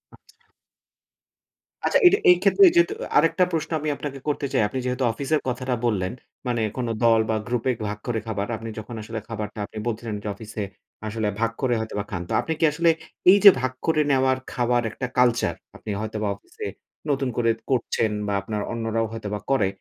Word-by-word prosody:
আচ্ছা। - - -27 1.4
আচ্ছা, - - +4
এটা 395 +3 +6
এই 360 - +9
ক্ষেত্রে 400 - +5
যেহেতু 345 +4 +4
আ - - -7
আরেকটা 185 - +4
প্রশ্ন 165 0 -2
আমি 150 +1 -2
আপনাকে 140 -2 -6
করতে 145 -1 -1
চাই। - - +3
আপনি 130 +5 -4
যেহেতু 125 +1 -1
অফিসের 140 +6 0
কথাটা 125 0 -1
বললেন, 95 -5 0 0.4
মানে 120 -2 0 0.2
কোন 125 -2 -1 0.2
দল 115 -1 +5
বা 110 - +2
গ্রুপে 125 +1 0 0.2
ভাগ 105 - -4
করে 115 -2 0
খাবার। 100 -2 -2
আপনি 115 +1 -7
যখন 110 +2 -8
আসলে 110 +1 -5
খাবারটা 105 -1 -5
আপনি 110 - -12
বলছিলেন 115 -1 -3
যে - - -5
অফিসে, 110 -2 -6 0.4
আসলে 110 0 -2
ভাগ 115 0 +1
করে 130 -3 +2
হয়তোবা 110 -2 -3
খান। 85 -3 -3
তো - - -2
আপনি 160 - -2
কি 160 - +4
আসলে, 165 +3 +2 0.4
এই 200 - +7
যে - - +15
ভাগ 130 -1 0
করে 155 -2 +3
নেওয়ার, 130 -1 +3
খাবার 120 0 +1
একটা 125 +2 -4
কালচার, 120 -2 +3 0.2
আপনি - - -10
হয়তোবা 110 -1 -3
অফিসে 100 - -10 0.4
নতুন 135 -2 +1
করে 115 -1 +2 0.2
করছেন 115 -3 +1 0.2
বা 100 - -1
আপনার 105 +1 -3
অন্যরাও 115 -1 -1
হয়তোবা 105 -2 -4
করে। 110 -8 +3
120 Hz, 190 wpm, -24 LUFS, 110-135 Hz, 1.4 s, যে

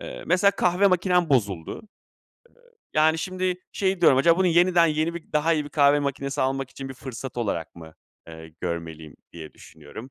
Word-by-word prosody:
Eee, - - -8
mesela 185 +3 +3
kahve 180 0 +1
makinem 180 -2 +2
bozuldu. 100 - 0
Iıı, - - -10 1.1
yani, 160 +1 +3
şimdi 185 +2 -2 0.2
şey 190 -2 -1
diyorum: 140 -6 +5
"Acaba 170 +5 +4
bunu 190 - +2
yeniden 175 0 +4
yeni 155 +2 -1
bir, 170 - -10
daha 155 +2 +2
iyi 150 -2 -1
bir 145 - -10
kahve 145 0 +4
makinesi 140 -1 -3
almak 135 0 -2
için 135 0 -8
bir 135 - -8
fırsat 130 0 -8
olarak 100 -9 -3
mı, 80 -2 -13 0.3
eee, 80 0 -11
görmeliyim?" 80 -3 -6 0.2
diye 80 -2 -10
düşünüyorum 125 +5 -13
145 Hz, 180 wpm, -24 LUFS, 120-175 Hz, 1.1 s, diyorum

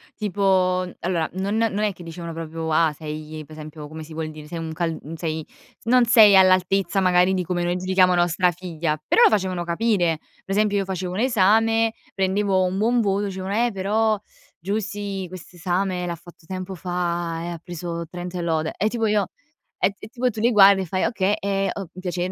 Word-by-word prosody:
tipo 185 -3 +1
allora 170 -3 -1
non 195 +3 -2
non 220 -2 +1
è 210 -2 +1
che 175 - -15
dicevano 170 0 -7
proprio: 165 0 -5
"Ah, 155 -1 +3
sei", 155 0 -7
per 155 - -13
esempio 155 -1 -9
come 160 +1 -9
si 155 +1 -10
vuol 155 0 -4
dire, 155 -1 -11
"Sei 170 - -6
un 160 -1 -5
cal 165 -1 -2
mhmm, 155 - -9
sei 160 -1 -4
s - - -26
non 250 +1 +5
sei 220 -3 +7
all'altezza 185 0 +4
magari 185 0 +3
di 185 - 0
come 175 0 -2
noi 175 0 0
giudichiamo 185 0 +3
nostra 175 +1 +3
figlia", 165 -3 -3
però - - +4
lo - - +8
facevano 185 -4 0
capire. 175 -2 +1 0.3
Per 195 - -3
esempio 210 -1 +2
io 195 - 0
facevo 185 -1 -4
un 185 - -3
esame, 225 -1 +3 0.2
prendevo 190 0 +1
un 185 +1 -1
buon 240 +3 +2
voto, 200 -2 +1
dicevano: 190 0 -4
"Eh, - - -3
però 210 +2 +1 0.4
Giusy 200 0 -3
quest'esame 180 +1 -3
l'ha 170 - -3
fatto 175 -1 -17
tempo 185 +1 -5
fa 175 -2 -2
e - - -4
ha 170 -2 -6
preso 170 -1 -5
30 180 0 -6
e - - -2
lode". 160 -2 -1
E 210 - +1
tipo 225 0 -1
io, 210 -3 +2 0.5
e 195 - +2
t 200 - -23
e - - -9
tipo 245 +2 -2
tu 215 - -7
li 235 +2 +3
guardi 200 -2 +7
e - - -3
fai: 185 +2 -1
"Okay, 205 -3 +1
è 195 0 0
o 195 -4 -6
piace" 180 -1 -2
185 Hz, 205 wpm, -23 LUFS, 170-200 Hz, 0.5 s, lo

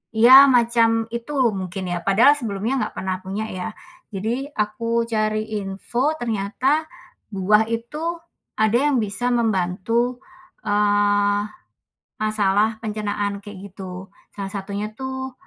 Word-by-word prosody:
iya, 260 +5 +9
macam 230 -2 +3
itu 235 +5 -5 0.2
mungkin 185 -1 -5
ya, 175 - -2
padahal 225 +9 +6
sebelumnya 220 +1 -2
nggak - - -15
pernah 190 0 -2
punya, 195 +3 -4
ya. 185 -1 -4 0.4
Jadi 235 +8 -3
aku 230 +2 -1
cari 215 -1 0 0.2
info, 235 +9 -2
ternyata 240 +7 0 0.4
buah 210 +2 +3
itu 300 +9 -3 0.4
ada 220 0 +2 0.2
yang 270 - +2
bisa 230 +5 -2
membantu, 230 +3 0 0.5
eee, 205 0 +2 0.8
masalah 215 0 +1
pencernaan, 205 -1 -2
kayak 200 -2 -10
gitu, 190 -1 -8 0.2
salah 200 -1 -6
satunya 200 +2 -4
tuh 265 0 -5
215 Hz, 115 wpm, -22 LUFS, 200-235 Hz, 0.8 s, iya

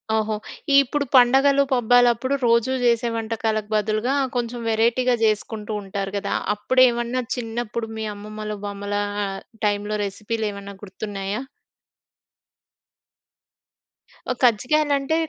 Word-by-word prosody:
ఓహో! 215 0 0 0.5
ఇప్పుడు 280 +2 -2
పండగలు 270 +3 +5
పబ్బాలప్పుడు 245 +1 +3
రోజూ 235 +2 +3
చేసే 235 -1 +2
వంటకాలకు 220 -1 -2
బదులుగా 215 +5 0 0.2
కొంచెం 240 0 -2
వేరైటీ‌గా 235 +3 +2
చేసుకుంటూ 215 0 -1
ఉంటారు 195 0 -5
కదా! 200 0 -2 0.2
అప్పుడేమన్నా 245 +2 +2
చిన్నప్పుడు 230 -1 -4
మీ 220 - -3
అమ్మమ్మలు, 215 +1 -6
బామ్మల 200 0 -3 0.7
టైమ్‌లో 205 +1 0
రెసిపీలేమన్నా 200 -1 -4
గుర్తున్నాయా? 200 +2 -5 2.9
ఓహ్! 250 - -3
కజ్జికాయలంటే 280 +5 +2
225 Hz, 90 wpm, -23 LUFS, 210-245 Hz, 2.9 s, పండగలు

